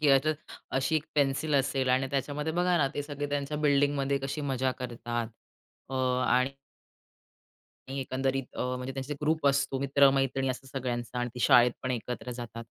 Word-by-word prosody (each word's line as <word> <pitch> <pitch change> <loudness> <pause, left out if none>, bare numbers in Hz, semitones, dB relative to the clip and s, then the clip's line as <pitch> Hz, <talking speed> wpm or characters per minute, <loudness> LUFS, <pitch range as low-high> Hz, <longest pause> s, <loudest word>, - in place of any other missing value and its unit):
की 150 - +2
याच्यात 140 +3 +4 0.4
अशी 135 +4 +1
एक 155 - -2
पेन्सिल 145 +1 +1
असेल 135 -1 +1
आणि 130 +1 +3
त्याच्यामध्ये 145 +3 -1
बघा 180 +1 +2
ना, 135 -2 +3
ते 145 - -1
सगळे 145 0 -4
त्यांच्या 145 +1 -1
बिल्डिंगमध्ये 140 -1 +2
कशी 135 +3 -3
मजा 130 -2 0
करतात 120 -1 -3 0.7
अ, - - -2 0.3
आणि 130 +2 +3 1.4
आणि 135 +1 -3
एकंदरीत 135 0 -1
अ, - - -1
म्हणजे 125 +1 -5
त्यांचे 135 +2 -4
ग्रुप 155 0 +1
असतो, 140 -1 +2
मित्रमैत्रिणी 135 -1 +3
असं 130 +1 -4
सगळ्यांचा 120 -1 -3
आणि 125 0 -1
ती 125 - -6
शाळेत 120 0 +6
पण 130 - -2
एकत्र 125 0 -4
जातात 120 -1 -7
135 Hz, 165 wpm, -29 LUFS, 125-145 Hz, 1.4 s, शाळेत